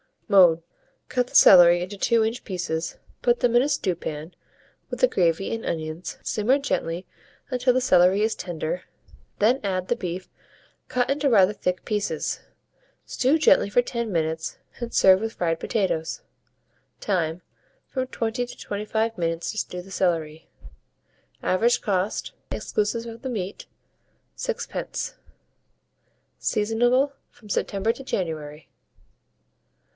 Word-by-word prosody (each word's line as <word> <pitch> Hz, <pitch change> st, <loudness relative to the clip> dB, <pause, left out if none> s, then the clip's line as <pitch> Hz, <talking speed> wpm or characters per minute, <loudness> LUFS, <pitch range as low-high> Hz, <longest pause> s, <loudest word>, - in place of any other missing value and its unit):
Mode. 180 Hz, -6 st, +6 dB, 0.5 s
Cut 250 Hz, -1 st, 0 dB
the -, -, -13 dB
celery 175 Hz, -2 st, +8 dB
into 190 Hz, +3 st, -5 dB
2 230 Hz, +3 st, +3 dB
inch 225 Hz, +2 st, -2 dB
pieces, 170 Hz, -4 st, -3 dB, 0.3 s
put 240 Hz, -1 st, +2 dB
them 240 Hz, -1 st, +3 dB
in 240 Hz, -, +7 dB
a 275 Hz, -, +1 dB
stew 185 Hz, -10 st, 0 dB
pan, 155 Hz, 0 st, -6 dB, 0.6 s
with -, -, -5 dB
the -, -, +7 dB
gravy 175 Hz, -, +1 dB
and 225 Hz, -, -4 dB
onions, 160 Hz, +1 st, -4 dB
simmer 225 Hz, +6 st, +2 dB
gently 180 Hz, -11 st, -2 dB, 0.5 s
until 250 Hz, 0 st, +2 dB
the 255 Hz, -, +2 dB
celery 185 Hz, -3 st, +4 dB
is 220 Hz, 0 st, +1 dB
tender, 175 Hz, -1 st, -4 dB, 0.6 s
when 235 Hz, +6 st, +4 dB
add 185 Hz, -2 st, -2 dB
the 240 Hz, -, +2 dB
beef 185 Hz, -4 st, -5 dB, 0.6 s
cut 245 Hz, -1 st, 0 dB
into 280 Hz, 0 st, +1 dB
rather 200 Hz, -5 st, +5 dB
thick 180 Hz, -3 st, -2 dB
pieces; 205 Hz, -7 st, -2 dB, 0.7 s
stew 265 Hz, +5 st, +2 dB
gently 290 Hz, -8 st, +4 dB
for 245 Hz, -, +4 dB
10 235 Hz, -2 st, -3 dB
minutes, 160 Hz, -1 st, -2 dB, 0.2 s
and 235 Hz, -1 st, -4 dB
serve 190 Hz, 0 st, +6 dB
with 225 Hz, +1 st, -3 dB
fried 165 Hz, -2 st, -1 dB
potatoes. 165 Hz, -7 st, -1 dB, 0.8 s
Time. 170 Hz, -4 st, -1 dB, 0.5 s
From 260 Hz, -1 st, -2 dB
20 235 Hz, 0 st, -2 dB
to -, -, -11 dB
25 220 Hz, +2 st, -2 dB
minutes 165 Hz, 0 st, -1 dB
to 220 Hz, -, -10 dB
stew 180 Hz, -3 st, -3 dB
the 195 Hz, -, -14 dB
celery. 165 Hz, -4 st, -1 dB, 0.9 s
Average 230 Hz, +6 st, +2 dB
cost, 195 Hz, 0 st, -1 dB, 0.2 s
exclusive 230 Hz, +2 st, -1 dB
of 230 Hz, 0 st, -9 dB
the 265 Hz, -, -4 dB
meat, 200 Hz, -5 st, -5 dB, 0.7 s
6d. 470 Hz, -1 st, -4 dB, 1.3 s
Seasonable 240 Hz, +6 st, +2 dB, 0.2 s
from 210 Hz, -, -18 dB
September 200 Hz, +2 st, 0 dB
to 245 Hz, +3 st, -9 dB
January. 155 Hz, -, -4 dB
200 Hz, 135 wpm, -25 LUFS, 175-235 Hz, 1.3 s, celery